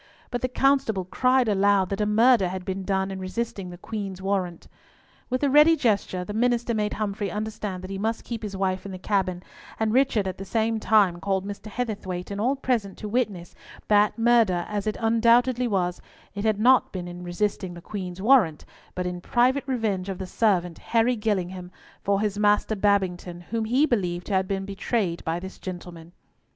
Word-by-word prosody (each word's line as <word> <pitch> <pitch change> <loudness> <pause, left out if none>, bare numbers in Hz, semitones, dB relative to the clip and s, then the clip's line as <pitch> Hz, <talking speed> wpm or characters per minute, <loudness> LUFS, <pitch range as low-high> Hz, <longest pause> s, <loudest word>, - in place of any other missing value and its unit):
But 245 -1 -2
the 255 - +1
constable 255 -7 +1
cried 255 +5 +2
aloud 200 -2 +3
that 195 +1 -2
a 210 - +1
murder 220 -1 +4
had 185 0 -5
been 190 0 -3
done 190 0 -1
in 190 - -5
resisting 190 0 -4
the 175 - -9
Queen's 195 -1 -5
warrant. 190 -3 -2 0.6
With 255 +2 -1
a 285 - +3
ready 300 +3 +7
gesture 200 - 0
the 205 - -6
minister 240 +1 +1
made 210 -1 -1
Humfrey 205 -1 -2
understand 210 -3 -4
that 185 - -7
he 195 - -4
must 220 +2 -2
keep 235 -2 -5
his 205 -3 -5
wife 190 -1 -1
in 200 - -7
the - - -5
cabin, 185 -2 -1 0.4
and 220 -1 +1
Richard 245 -6 +2
at 185 - -5
the - - -4
same 225 +2 0
time 205 -5 +3
called 195 0 -1
Mr. 205 +1 -7
Heatherthwayte 200 -6 -4
and 200 +1 -3
all 255 +5 +2
present 235 -7 -1
to 210 - -6
witness 210 -6 -2 0.4
that, 210 +1 +4
murder 225 -6 +3
as 210 -1 -3
it 215 - -1
undoubtedly 235 +2 +3
was, 180 -4 -1 0.3
it 200 +1 -4
had 215 -2 +2
not 255 +4 +4
been 180 -2 -5
in 175 0 -8
resisting 180 0 -2
the - - -9
Queen's 180 0 -6
warrant, 210 - +4 0.3
but 180 - -2
in 180 0 -4
private 255 +7 +2
revenge 215 -7 -1
of 190 - -4
the 190 - -5
servant, 180 -4 0
Harry 235 +2 +2
Gillingham, 185 -5 -2 0.3
for 200 0 +1
his 210 -1 -1
master 210 +1 +3
Babington, 190 -4 0
whom 225 -1 -1
he 255 +7 +3
believed 180 - -1
to 205 - -4
have 190 0 +2
been 195 0 -2
betrayed 195 -2 -2
by 165 +1 -2
this 190 +1 -9
gentleman. 175 -2 -8
205 Hz, 195 wpm, -25 LUFS, 185-225 Hz, 0.6 s, ready